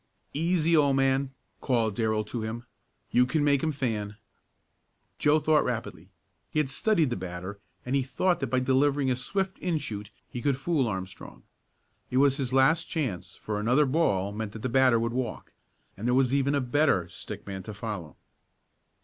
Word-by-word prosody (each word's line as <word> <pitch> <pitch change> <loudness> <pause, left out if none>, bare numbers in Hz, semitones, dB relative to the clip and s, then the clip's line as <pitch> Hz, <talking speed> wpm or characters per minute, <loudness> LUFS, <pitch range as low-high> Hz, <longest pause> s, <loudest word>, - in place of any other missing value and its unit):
"Easy, 165 +1 +2
old 140 -3 +4
man!" 135 0 +2 0.3
called 115 -5 +1
Darrell 110 0 0
to 110 +2 -5
him. 115 +2 -5 0.5
"You 125 +1 +4
can 145 +3 +1
make 140 -2 +3
him 160 - 0
fan." 110 -7 -3 1.0
Joe 150 +1 +4
thought 155 0 +3
rapidly. - - -4 0.4
He - - -5
had 150 -3 +2
studied 160 - +1
the - - 0
batter 90 +2 -6 0.3
and 125 +2 -1
he 140 - +3
thought 155 +8 0
that 135 - -1
by 130 0 +1
delivering 135 +1 +2
a - - +2
swift 190 +9 -2
in 175 -3 0
shoot 105 -7 -5 0.2
he 120 - -6
could 140 +1 +1
fool 140 -2 +1
Armstrong. 95 -3 -6 0.7
It 125 - -1
was 135 0 +4
his 135 -3 -2
last 145 +6 +4
chance, 100 - -3
for 105 -1 -4
another 125 +8 +3
ball 100 - +1
meant 105 0 -5
that 110 - -8
the 130 - 0
batter 125 -1 +4
would 115 +1 -1
walk, 130 -1 -4 0.4
and 110 +4 -4
there 125 - +3
was 130 -1 +3
even 140 +1 +2
a 140 - +1
better 125 - +2
stick - - -9
man 95 -1 -5
to 105 +3 -8
follow. 100 -7 -6
130 Hz, 185 wpm, -28 LUFS, 110-145 Hz, 1.0 s, old